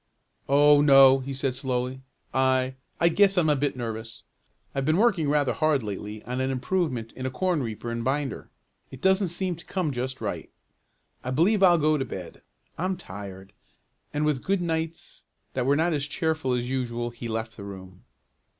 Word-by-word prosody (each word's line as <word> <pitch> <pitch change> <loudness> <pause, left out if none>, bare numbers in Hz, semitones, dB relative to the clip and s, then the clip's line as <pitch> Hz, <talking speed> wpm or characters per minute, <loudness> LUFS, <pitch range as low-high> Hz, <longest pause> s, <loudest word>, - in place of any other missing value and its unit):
"Oh 145 +1 +6
no," 135 -2 +7
he 135 +1 -6
said 135 -1 -1
slowly. 130 0 -3 0.3
"I 130 0 +2 0.3
I 170 - +4
guess 195 +3 +4
I'm 160 -4 +4
a - - +3
bit 140 -1 -1
nervous. 115 -1 -6 0.5
I've 135 - -1
been 155 +4 +2
working 195 -9 +3
rather 145 -2 +2
hard 155 -5 +1
lately 105 +1 -6
on 125 +1 -3
an 130 - 0
improvement 130 -4 -1
in 130 0 -5
a - - -1
corn 175 +4 0
reaper 115 0 -4
and 115 0 -3
binder. 135 +1 -2 0.4
It 130 - -10
doesn't 190 +4 +3
seem 175 +1 -1
to 170 - -11
come 180 -6 -1
just 130 +1 -4
right. - - -4 0.7
I 125 - -4
believe 175 +10 +2
I'll 175 -3 +6
go 155 -1 +2
to - - 0
bed. 95 -7 -8 0.4
I'm 185 +2 -1
tired," 95 - -9 0.6
and 150 +1 0
with 150 -4 +1
"good 195 0 +1
nights" 165 -1 -4 0.3
that 130 -1 -1
were 140 - +4
not 165 +3 +2
as 145 -1 -1
cheerful 160 -4 -1
as 120 0 -1
usual 120 -2 -2
he 120 0 -7
left 110 0 -3
the 100 - -9
room. 95 -2 -10
135 Hz, 185 wpm, -26 LUFS, 120-160 Hz, 0.7 s, no